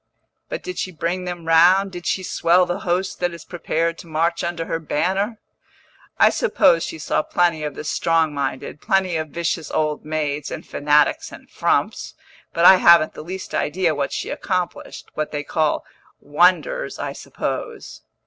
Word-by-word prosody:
"But - - -5
did 365 0 -5
she 185 - -3
bring 175 +2 -3
them 175 -2 -6
round, 180 +4 +5
did 175 -2 -7
she 185 - 0
swell 180 0 +3
the 175 0 -3
host 180 +2 -2
that 175 -1 -1
is 170 - -12
prepared 165 -1 -2
to 175 - -11
march 165 +2 0
under 170 -1 -3
her 165 - -2
banner?" 190 +8 -1 0.8
"I - - +6
suppose 170 - +3
she - - -5
saw 155 - 0
plenty 170 -1 0
of 150 -2 -4
the - - -6
strong 165 0 +1
minded, 140 0 -4
plenty 190 -2 +1
of 155 0 -2
vicious 165 0 -3
old 150 -1 -1
maids, 150 -2 -3
and - - -7
fanatics, 145 0 +1
and - - -13
frumps. - - -1 0.4
But 170 - +1
I 190 - +10
haven't 170 -3 +6
the - - -8
least 185 +4 -7
idea 170 +1 0
what 140 -1 -2
she - - -4
accomplished 180 -2 -3
what 155 0 -3
they 145 -1 -3
call 155 +1 0 0.3
'wonders,' 185 - +1
I - - -4
suppose." - - -6
170 Hz, 170 wpm, -21 LUFS, 155-180 Hz, 0.8 s, I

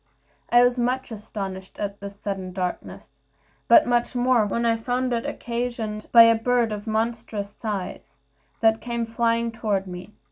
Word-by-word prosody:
I 240 +1 +6
was 245 0 +2
much 250 +1 -1
astonished 195 -3 -7
at 200 -1 -4
this 200 0 -9
sudden 190 -3 -4
darkness, 180 -1 -5 0.5
but - - +7
much 240 +1 0
more 245 -3 +3
when 235 +3 -1
I 230 -1 +3
found 245 +2 -1
it 230 - -2
occasioned 235 -3 -4
by 230 -1 +10
a 230 0 +6
bird 235 0 +1
of 210 +1 -5
a - - -2
monstrous 220 -2 -2
size, 205 -9 -5 0.4
that 225 0 +3
came 235 -1 -2
flying 230 0 0
toward 210 -4 -1
me. 180 +3 -9
225 Hz, 165 wpm, -24 LUFS, 205-240 Hz, 0.5 s, by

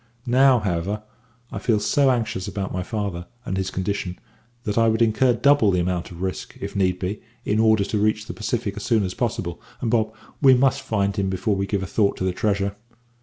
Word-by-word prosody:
Now, 130 +1 +5
however, 100 0 -2 0.5
I - - -4
feel 110 -3 +2
so 140 +5 +3
anxious 110 -7 -1
about 95 -1 -4
my 90 - -1
father, 95 -3 -4 0.2
and 95 - -2
his 95 0 -1
condition, 95 -1 -3 0.5
that 105 -4 -2
I 115 0 +4
would 110 0 +2
incur 115 +3 +3
double 140 -2 +4
the 90 -2 +2
amount 90 0 -1
of 90 +1 -8
risk, 95 -1 -4
if - - -6
need 90 -2 +1
were, 95 +4 -2 0.3
in 105 - +1
order 110 -2 +4
to 105 +1 -1
reach 110 0 +1
the 115 - -6
Pacific 105 -2 -2
as 105 - -6
soon 115 -4 +2
as 95 -1 -3
possible, 85 -1 -3 0.2
and, 115 - -1
Bob, 110 -2 +2 0.3
we 135 -3 +7
must 130 +1 +2
find 100 -2 0
him 100 -2 0
before 95 +2 0
we 100 0 -1
give 100 -1 -1
a - - -2
thought 100 +1 +1
to - - -3
the 95 -1 0
treasure. 100 0 0
105 Hz, 220 wpm, -23 LUFS, 95-110 Hz, 0.5 s, we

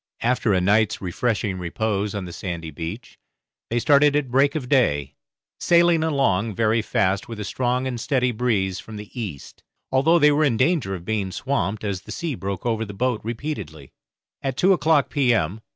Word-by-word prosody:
After 120 -2 +1
a 95 - +3
night's 105 +3 +2
refreshing 100 0 -2
repose 100 +3 -2
on 100 -2 -3
the 85 - -8
sandy 85 -4 -5
beach, 95 - -7 0.5
they 120 - -1
started 145 +3 +4
at 140 -4 0
break 140 +3 +3
of 140 -5 -3
day, 75 - +2 0.5
sailing 170 -1 +4
along 115 -9 +1
very 115 +1 +2
fast 95 -2 0
with 115 -2 -7
a - - -3
strong 125 +4 -1
and 125 -3 -3
steady 125 -2 +1
breeze 105 -6 0
from 110 - -10
the 105 0 -9
east, 100 - -7 0.3
although 145 +6 +4
they 150 -2 +5
were 150 +2 +2
in 130 -7 +2
danger 130 - +1
of 85 -1 -9
being 105 -2 -1
swamped, 110 -4 -2
as 100 -3 -3
the - - -11
sea 170 -4 -3
broke 100 -3 -5
over 115 -2 0
the 100 -2 -8
boat 125 +1 0
repeatedly. 110 - -6 0.5
At 135 -2 -3
two 190 +5 +5
o'clock 155 -4 +2
p.m. 115 - +1
115 Hz, 185 wpm, -23 LUFS, 95-135 Hz, 0.5 s, they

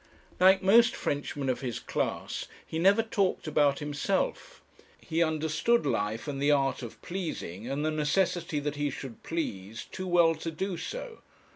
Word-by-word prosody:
Like 190 +1 +6
most 230 +4 +6
Frenchmen 145 -1 -2
of 130 - 0
his 125 -4 -3
class, - - -3 0.2
he 160 - -4
never 195 +5 +5
talked 200 -4 0
about 145 -3 +3
himself. 170 - -2 0.4
He 165 0 -1
understood 160 +8 +2
life, 105 +6 -1
and 140 -2 -3
the 145 - +3
art 140 -2 +2
of 120 -3 -8
pleasing, 130 - -5
and 140 +3 -1
the 155 - +1
necessity 160 +1 0
that 145 0 -3
he 145 0 0
should 135 -4 -8
please, 110 - -4
too 185 0 -5
well 170 -2 +5
to 160 +1 -5
do 185 +4 -3
so. - - -6
155 Hz, 160 wpm, -29 LUFS, 140-185 Hz, 0.4 s, Like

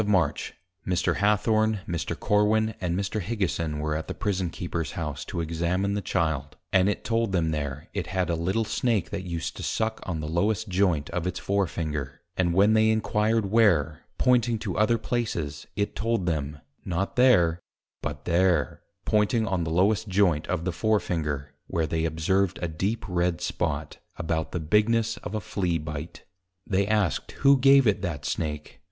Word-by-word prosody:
_ - - -1
of - - -5
March, 90 -8 +1 0.3
Mr. 90 -1 0
Hathorne, 110 +1 +2
Mr. 85 -2 -3
Corwin, 110 +1 +2
and 90 -1 -1
Mr. 100 +2 -2
Higison, 85 -7 -2
were 75 0 -1
at 80 - -4
the - - -5
Prison 95 -3 -1
Keeper's 85 -1 -4
House 75 -3 -4
to 85 - -3
Examine 85 +4 -1
the 105 - -1
Child, 80 -6 -1 0.2
and 95 +1 +5
it 105 - -2
told 115 -2 0
them 80 -3 +1
there, 75 0 -4
it 100 -4 -3
had 95 -1 -1
a - - +1
little 95 +7 0
Snake 110 -4 0
that 100 - -3
used 85 -2 -4
to - - -6
suck 110 0 -1
on 85 -4 -4
the 75 - -4
lowest 100 +6 0
Joynt 90 -6 +1
of 90 0 -2
its 90 0 -2
Fore 100 -1 0
Finger; 75 -5 -4
and 85 -2 +1
when 100 +3 +5
they 110 0 +4
enquired 110 -1 +1
where, 85 -10 +3 0.2
pointing 120 -2 +3
to 105 -4 -4
other 110 +2 +3
places, 85 -12 -3
it 100 0 -1
told 115 -4 0
them, 75 -3 -2 0.3
not 95 +1 -2
there, 90 -10 +4 0.4
but 75 0 -5
there, 85 -5 +2 0.2
pointing 110 +2 +2
on 95 -4 0
the 80 - -3
lowest 100 +6 +2
Joint 90 -6 +2
of 85 -2 -2
the 90 - 0
Fore 110 +4 +2
Finger, 75 -6 -3
where 80 -1 0
they 80 +1 -1
observed 85 +4 +1
a 85 - -2
deep 95 +8 -2
Red 90 -2 0
Spot, 75 0 -2 0.2
about 80 -1 -2
the 90 - -2
bigness 110 +7 +2
of 110 - -6
a - - 0
Flea 90 -2 -1
bite; 75 0 -7 0.4
they 100 0 +1
asked 105 -5 0
who 140 0 +8
gave 135 +1 +6
it 105 -2 +2
that 85 -7 -4
Snake? 75 -2 -3
90 Hz, 185 wpm, -26 LUFS, 80-105 Hz, 0.4 s, who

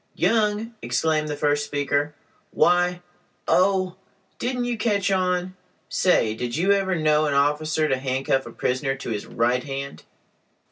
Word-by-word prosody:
"Young!" 220 0 +1
exclaimed 155 -1 0
the 150 - -3
first 145 0 +1
speaker, 145 +1 -1 0.3
"why—Oh! 180 +2 +1 0.4
didn't 250 0 -1
you 245 -1 -1
catch 205 -3 0
on? 185 -1 0 0.3
Say—did 120 -7 +1
you 185 +4 +2
ever 195 -2 +2
know 155 -1 +2
an 145 - 0
officer 150 +2 +1
to 135 -3 +1
handcuff 135 0 -1
a - - -8
prisoner 135 +3 -1
to 135 -3 -6
his 105 -2 -4
right 120 +2 0
hand?" 140 0 -6
155 Hz, 135 wpm, -24 LUFS, 140-185 Hz, 0.4 s, you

